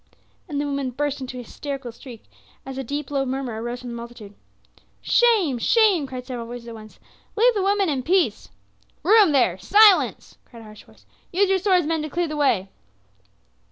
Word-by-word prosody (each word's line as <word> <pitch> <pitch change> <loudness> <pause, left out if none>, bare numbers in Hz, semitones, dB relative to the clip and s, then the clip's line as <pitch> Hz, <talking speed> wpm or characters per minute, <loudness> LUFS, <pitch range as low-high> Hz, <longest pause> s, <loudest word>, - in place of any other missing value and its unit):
and 290 -2 -3
the 290 - -1
woman 280 -2 -2
burst 285 +2 -3
into 255 -1 -7
a - - -7
hysterical 270 +1 -7
shriek 235 -1 -13 0.4
as 270 0 -7
a 270 - -4
deep 285 +2 -5
low 275 -1 0
murmur 260 -4 -4
arose 240 +1 -5
from 250 - -8
the - - -6
multitude. 235 -3 -10 0.7
"Shame! 415 - +2
Shame!" 395 - +3
cried 255 -1 -7
several 245 -3 -6
voices 240 0 -9
at - - -8
once. 215 -1 -13 0.4
"Leave 475 +3 +4
the 410 - -1
women 395 0 +1
in 280 -5 -1
peace!" 330 - 0 0.5
"Room 405 0 +5
there! 240 -10 +2
Silence!" 410 - +4
cried 230 -2 -15
a - - -13
harsh 215 -1 -14
voice. - - -23 0.3
"Use 390 +2 +2
your 385 - +2
swords, 370 -3 +2
men, 320 0 -1
to 305 - -5
clear 345 +3 -1
the 305 - -5
way!" 230 -10 +1
275 Hz, 195 wpm, -22 LUFS, 240-350 Hz, 0.7 s, Room